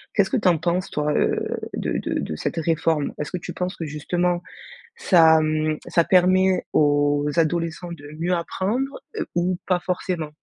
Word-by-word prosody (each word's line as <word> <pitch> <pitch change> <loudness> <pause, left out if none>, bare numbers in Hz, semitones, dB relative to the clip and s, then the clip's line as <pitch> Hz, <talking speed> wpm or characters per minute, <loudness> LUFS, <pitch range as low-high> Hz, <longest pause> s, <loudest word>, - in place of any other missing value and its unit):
Qu'est-ce 200 -3 +3
que 265 - +1
tu 205 - +1
en 175 -2 +4
penses, 175 +3 -1
toi, 150 0 -1
heu, - - 0 0.2
de - - -2
de - - -2
de 80 - -4
cette - - -3
réforme? 160 -2 0
Est-ce 150 - -4
que 180 - -2
tu 175 - -7
penses 180 +1 -3
que, 165 - -5
justement, 175 +4 -1 0.5
ça 165 - +5
mmh, 155 0 0
ça 170 - +3
permet 185 +1 +3
aux 145 0 +3
adolescents 165 +1 0
de 145 -2 -11
mieux 175 +2 0
apprendre, 210 +10 -2
heu, 395 - -2
ou 175 +1 +1
pas 180 -1 +1
forcément? 175 -3 -3
170 Hz, 180 wpm, -23 LUFS, 155-185 Hz, 0.5 s, ça